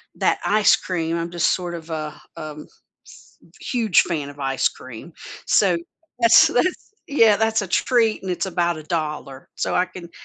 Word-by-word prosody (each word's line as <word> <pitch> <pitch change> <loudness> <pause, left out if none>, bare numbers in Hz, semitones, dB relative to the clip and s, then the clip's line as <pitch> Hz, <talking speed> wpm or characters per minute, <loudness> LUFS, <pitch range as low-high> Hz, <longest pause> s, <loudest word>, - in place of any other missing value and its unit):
that - - +1
ice 210 0 +4
cream, 165 -3 -3
I'm 170 0 -3
just 170 -1 +1
sort 175 -2 -4
of 165 0 -10
a, 155 -1 -5 0.2
um, 150 -1 -8 0.4
s - - -18 0.2
huge 225 -7 +2
fan 150 -5 -3
of 145 0 -13
ice 135 -1 +1
cream, 130 +6 -11 0.3
so 185 -4 +3 0.4
that's 230 -1 +7
that's 350 +9 -1 0.2
Yeah, 225 -7 +5
that's 220 0 +1
a 200 - -5
treat, 225 +2 +1
and 190 - -5
it's 180 - -2
about 175 -2 0
$1, 150 -4 -5
so - - -2
I 180 - +3
can 180 -2 -11
175 Hz, 170 wpm, -22 LUFS, 155-210 Hz, 0.4 s, that's